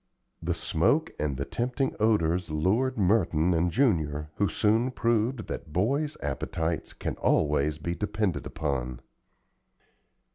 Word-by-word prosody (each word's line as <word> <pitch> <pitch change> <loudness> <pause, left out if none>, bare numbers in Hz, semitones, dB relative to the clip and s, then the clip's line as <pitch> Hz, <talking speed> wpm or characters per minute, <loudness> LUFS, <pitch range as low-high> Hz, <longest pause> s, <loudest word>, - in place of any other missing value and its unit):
The - - -1
smoke - - +1
and 75 -3 -1
the 70 - -2
tempting 125 +3 -1
odors 90 -6 +2
lured 105 +12 +1
Merton 90 -4 +3
and 85 +1 +2
Junior, 75 - +1
who 100 - +2
soon 110 +8 +2
proved 115 -1 0
that 80 - -6
boys' 140 - 0
appetites 80 +3 -2
can - - -4
always 75 0 +2
be 85 +2 -3
depended 105 0 -1
upon. 65 -5 -3
90 Hz, 120 wpm, -28 LUFS, 75-115 Hz, -, Merton